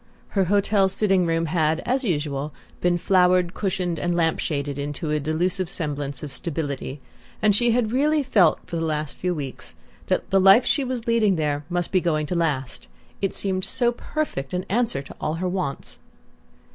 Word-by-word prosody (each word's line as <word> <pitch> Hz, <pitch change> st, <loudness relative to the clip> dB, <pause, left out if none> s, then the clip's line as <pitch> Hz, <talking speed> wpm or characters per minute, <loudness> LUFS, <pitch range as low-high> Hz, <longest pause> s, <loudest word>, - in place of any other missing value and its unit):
Her 195 Hz, -2 st, +1 dB
hotel 200 Hz, +1 st, +3 dB
sitting 190 Hz, -3 st, +2 dB
room 165 Hz, 0 st, +1 dB
had, 160 Hz, -1 st, +1 dB
as 260 Hz, +2 st, 0 dB
usual, 150 Hz, -, -2 dB, 0.2 s
been 175 Hz, 0 st, +2 dB
flowered, 180 Hz, -1 st, +3 dB
cushioned 180 Hz, -4 st, -2 dB
and 175 Hz, +2 st, 0 dB
lamp 165 Hz, -2 st, +1 dB
shaded 145 Hz, -2 st, -2 dB
into 145 Hz, +2 st, -3 dB
a 150 Hz, -, +1 dB
delusive 175 Hz, +5 st, -1 dB
semblance 145 Hz, -6 st, -4 dB
of 145 Hz, -, -6 dB
stability; 145 Hz, -2 st, -4 dB, 0.4 s
and 210 Hz, -2 st, +4 dB
she 240 Hz, +3 st, +3 dB
had 230 Hz, -2 st, +1 dB
really 295 Hz, +4 st, +2 dB
felt, 195 Hz, -, +4 dB
for 170 Hz, -, -4 dB
the 165 Hz, -, -1 dB
last 155 Hz, -2 st, -2 dB
few 180 Hz, -1 st, -2 dB
weeks, 140 Hz, -4 st, -7 dB, 0.3 s
that -, -, 0 dB
the 195 Hz, 0 st, +4 dB
life 195 Hz, +6 st, +7 dB
she 285 Hz, -, +2 dB
was 250 Hz, -3 st, -3 dB
leading 225 Hz, -5 st, +3 dB
there 150 Hz, -2 st, -1 dB
must 175 Hz, -1 st, -1 dB
be 185 Hz, -, +3 dB
going 155 Hz, -3 st, 0 dB
to 180 Hz, -, -3 dB
last 145 Hz, -7 st, -1 dB, 0.3 s
it 195 Hz, -, +1 dB
seemed 190 Hz, -1 st, -1 dB
so 240 Hz, +4 st, +1 dB
perfect 240 Hz, -, -4 dB
an 180 Hz, -, -2 dB
answer 220 Hz, -, 0 dB
to -, -, -12 dB
all 155 Hz, -, -1 dB
her 180 Hz, +2 st, -2 dB
wants! 180 Hz, -6 st, -3 dB
175 Hz, 185 wpm, -24 LUFS, 150-195 Hz, 0.4 s, life